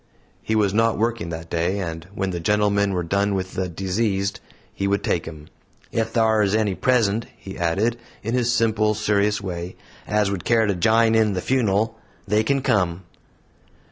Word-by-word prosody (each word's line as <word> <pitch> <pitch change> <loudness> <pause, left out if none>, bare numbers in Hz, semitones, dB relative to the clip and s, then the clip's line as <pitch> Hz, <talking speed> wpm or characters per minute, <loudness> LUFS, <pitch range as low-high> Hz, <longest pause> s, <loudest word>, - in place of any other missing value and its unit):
He 110 - -1
was 100 -3 +2
not 115 +1 +2
working 115 -5 -1
that 80 0 -7
day; 85 +3 0
and 85 -3 -5
when 95 -1 -1
the 85 - -3
gentlemen 100 +2 +2
were 90 -1 -1
done 100 +4 0
with 95 -1 -3
the 95 -1 -2
"diseased," 95 +2 -1 0.3
he 100 - -2
would 100 +1 0
take 85 - -1
him. 75 -2 -9 0.5
"Ef 115 0 0
thar 110 -2 +3
is 100 0 +2
any 110 -3 +1
present," 115 -1 +1
he 95 -3 -9
added, 100 +8 0 0.2
in 115 +3 -2
his 120 -1 +1
simple, 110 -2 +2
serious 105 0 +1
way, 90 -2 -5 0.3
"as 105 -1 +1
would 95 -4 -3
care 115 -1 +3
to 100 - +1
jine 110 +4 +3
in 110 -2 +3
the 90 - -1
fun'l, 110 -1 +1 0.3
they 105 +2 +2
kin 135 +3 0
come." 90 -3 +1
100 Hz, 180 wpm, -23 LUFS, 95-110 Hz, 0.5 s, thar